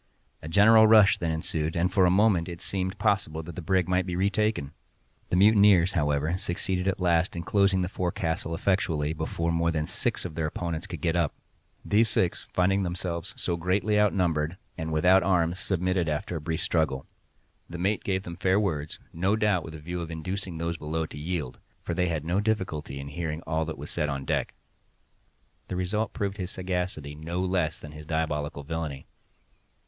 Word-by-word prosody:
A -, -, -8 dB
general 110 Hz, +4 st, +7 dB
rush 105 Hz, -2 st, +6 dB
then 85 Hz, -, -1 dB
ensued, 80 Hz, 0 st, -1 dB
and 90 Hz, +2 st, +1 dB
for 95 Hz, -2 st, +5 dB
a -, -, +4 dB
moment 95 Hz, -3 st, +3 dB
it 85 Hz, -1 st, -7 dB
seemed 95 Hz, +1 st, -2 dB
possible 100 Hz, -6 st, 0 dB
that 85 Hz, 0 st, -9 dB
the -, -, -5 dB
brig 90 Hz, +1 st, +1 dB
might 90 Hz, 0 st, +1 dB
be 90 Hz, -, -2 dB
retaken. 100 Hz, -5 st, 0 dB, 0.6 s
The -, -, +1 dB
mutineers, 100 Hz, -2 st, +6 dB
however, 75 Hz, +1 st, 0 dB
succeeded 90 Hz, +1 st, -1 dB
at 95 Hz, -1 st, 0 dB
last 85 Hz, -1 st, +2 dB
in 85 Hz, -, -4 dB
closing 100 Hz, -1 st, +2 dB
the -, -, -1 dB
forecastle 85 Hz, -3 st, -2 dB
effectually 80 Hz, -5 st, 0 dB
before 80 Hz, +1 st, -2 dB
more 85 Hz, 0 st, +1 dB
than 80 Hz, -2 st, -1 dB
six -, -, -1 dB
of 85 Hz, -, -5 dB
their 80 Hz, 0 st, -1 dB
opponents 85 Hz, +2 st, -4 dB
could 85 Hz, -6 st, -7 dB
get 85 Hz, 0 st, +1 dB
up. 85 Hz, -4 st, +1 dB, 0.5 s
These 110 Hz, +2 st, +3 dB
six, 90 Hz, -, 0 dB
finding 95 Hz, +2 st, +2 dB
themselves 90 Hz, -2 st, -3 dB
so 85 Hz, -, -1 dB
greatly 100 Hz, +5 st, +1 dB
outnumbered 90 Hz, -5 st, +1 dB, 0.2 s
and 80 Hz, -1 st, -4 dB
without 90 Hz, +5 st, +5 dB
arms, 90 Hz, -1 st, +1 dB
submitted 90 Hz, -2 st, 0 dB
after 75 Hz, +3 st, -2 dB
a -, -, -6 dB
brief 80 Hz, +1 st, -2 dB
struggle. 80 Hz, -5 st, 0 dB, 0.6 s
The 85 Hz, -, -6 dB
mate 100 Hz, +4 st, 0 dB
gave 95 Hz, -1 st, -1 dB
them 85 Hz, -2 st, -7 dB
fair 95 Hz, +1 st, +2 dB
words—no 85 Hz, +2 st, -1 dB
doubt 105 Hz, -5 st, +1 dB
with 80 Hz, -, -8 dB
a -, -, -8 dB
view 85 Hz, +3 st, -5 dB
of 85 Hz, -, -5 dB
inducing 90 Hz, +2 st, -4 dB
those 85 Hz, 0 st, -2 dB
below 80 Hz, +1 st, -2 dB
to 75 Hz, -, -10 dB
yield, 75 Hz, -6 st, -4 dB, 0.2 s
for 85 Hz, -, -3 dB
they 90 Hz, +1 st, +1 dB
had 80 Hz, -3 st, -2 dB
no 90 Hz, +4 st, +1 dB
difficulty 95 Hz, -10 st, -2 dB
in 70 Hz, +1 st, -6 dB
hearing 80 Hz, +1 st, -4 dB
all 80 Hz, 0 st, -1 dB
that 80 Hz, -2 st, -5 dB
was 75 Hz, +2 st, -7 dB
said 75 Hz, -3 st, -1 dB
on 70 Hz, -1 st, -3 dB
deck. -, -, -1 dB, 1.1 s
The -, -, -4 dB
result 100 Hz, +5 st, -1 dB
proved 100 Hz, 0 st, -3 dB
his 90 Hz, -3 st, -4 dB
sagacity, 90 Hz, -6 st, -3 dB
no 80 Hz, +4 st, -4 dB
less 90 Hz, -4 st, 0 dB
than 75 Hz, -, -10 dB
his 75 Hz, 0 st, -11 dB
diabolical 75 Hz, -2 st, -2 dB
villainy. 75 Hz, -2 st, -4 dB
85 Hz, 190 wpm, -27 LUFS, 80-95 Hz, 1.1 s, general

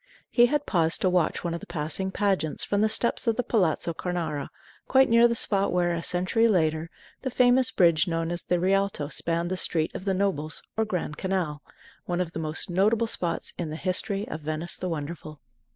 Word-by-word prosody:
He 240 Hz, -1 st, +6 dB
had 290 Hz, +2 st, 0 dB
paused 165 Hz, -3 st, +1 dB
to 185 Hz, -, +2 dB
watch 180 Hz, -3 st, +1 dB
one 170 Hz, -1 st, -2 dB
of 170 Hz, -, -3 dB
the -, -, -12 dB
passing 165 Hz, +3 st, -3 dB
pageants 190 Hz, -6 st, 0 dB
from 205 Hz, 0 st, 0 dB
the 215 Hz, -, +3 dB
steps 235 Hz, +2 st, 0 dB
of 230 Hz, -, +3 dB
the 250 Hz, -, 0 dB
Palazzo 175 Hz, -7 st, +1 dB
Cornaro, 165 Hz, -4 st, -3 dB, 0.4 s
quite 265 Hz, 0 st, +5 dB
near 230 Hz, +1 st, +6 dB
the 235 Hz, -, -1 dB
spot 200 Hz, -3 st, +2 dB
where, 175 Hz, -1 st, +1 dB
a 170 Hz, -, -2 dB
century 185 Hz, +7 st, +1 dB
later, 160 Hz, -5 st, +1 dB, 0.3 s
the 260 Hz, -, -2 dB
famous 250 Hz, +1 st, +4 dB
bridge 170 Hz, -2 st, +3 dB
known 165 Hz, 0 st, -1 dB
as 175 Hz, 0 st, -1 dB
the 180 Hz, -, 0 dB
Rialto 195 Hz, -5 st, +1 dB
spanned 170 Hz, +3 st, -2 dB
the 185 Hz, -, -1 dB
Street 160 Hz, -3 st, -1 dB
of 190 Hz, -, -7 dB
the 195 Hz, -1 st, +1 dB
Nobles, 180 Hz, -6 st, -1 dB
or 220 Hz, -, +1 dB
Grand 180 Hz, -7 st, -3 dB
Canal 180 Hz, -6 st, -2 dB, 0.4 s
one 175 Hz, 0 st, -2 dB
of 180 Hz, -2 st, -1 dB
the 165 Hz, -, -5 dB
most 155 Hz, 0 st, -3 dB
notable 210 Hz, +6 st, +2 dB
spots 175 Hz, -6 st, -2 dB
in 170 Hz, -3 st, -2 dB
the 155 Hz, -, -5 dB
history 195 Hz, +4 st, -1 dB
of 155 Hz, -, -6 dB
Venice 155 Hz, +3 st, -3 dB
the 180 Hz, -, -4 dB
Wonderful. 155 Hz, -1 st, -6 dB
180 Hz, 205 wpm, -26 LUFS, 160-200 Hz, 0.4 s, He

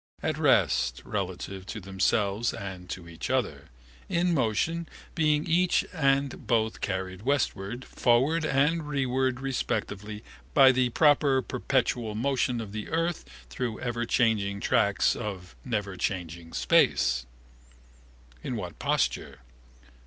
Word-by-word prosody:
At -, -, -1 dB
rest -, -, +2 dB
relatively 95 Hz, -1 st, -4 dB
to 110 Hz, -, -6 dB
themselves 100 Hz, +3 st, 0 dB
and 95 Hz, -2 st, -7 dB
to 90 Hz, -2 st, -6 dB
each 85 Hz, -1 st, -6 dB
other. -, -, -1 dB, 0.4 s
In 175 Hz, +1 st, +1 dB
motion 160 Hz, +6 st, 0 dB, 0.2 s
being 150 Hz, -2 st, +2 dB
each 175 Hz, +2 st, +2 dB
and 140 Hz, -4 st, 0 dB
both 110 Hz, -2 st, +1 dB
carried 95 Hz, -1 st, -3 dB
westward, 125 Hz, -3 st, -1 dB
forward 135 Hz, +7 st, +2 dB
and 150 Hz, +2 st, +1 dB
rereward 130 Hz, -2 st, 0 dB
respectively, 105 Hz, -5 st, -3 dB, 0.3 s
by 135 Hz, -2 st, +8 dB
the 130 Hz, -1 st, +2 dB
proper 140 Hz, -1 st, +4 dB
perpetual 125 Hz, -4 st, -1 dB
motion 125 Hz, 0 st, 0 dB
of 110 Hz, -3 st, -6 dB
the 105 Hz, 0 st, -6 dB
earth 165 Hz, +1 st, -1 dB, 0.3 s
through 120 Hz, -3 st, -3 dB
everchanging 115 Hz, -4 st, 0 dB
tracks 100 Hz, -1 st, +2 dB
of 95 Hz, -6 st, -6 dB
neverchanging 95 Hz, -6 st, -3 dB
space. 60 Hz, -1 st, +2 dB, 1.1 s
In 125 Hz, -, -4 dB
what 90 Hz, -6 st, -6 dB
posture? 65 Hz, -, -1 dB
120 Hz, 115 wpm, -28 LUFS, 100-135 Hz, 1.1 s, by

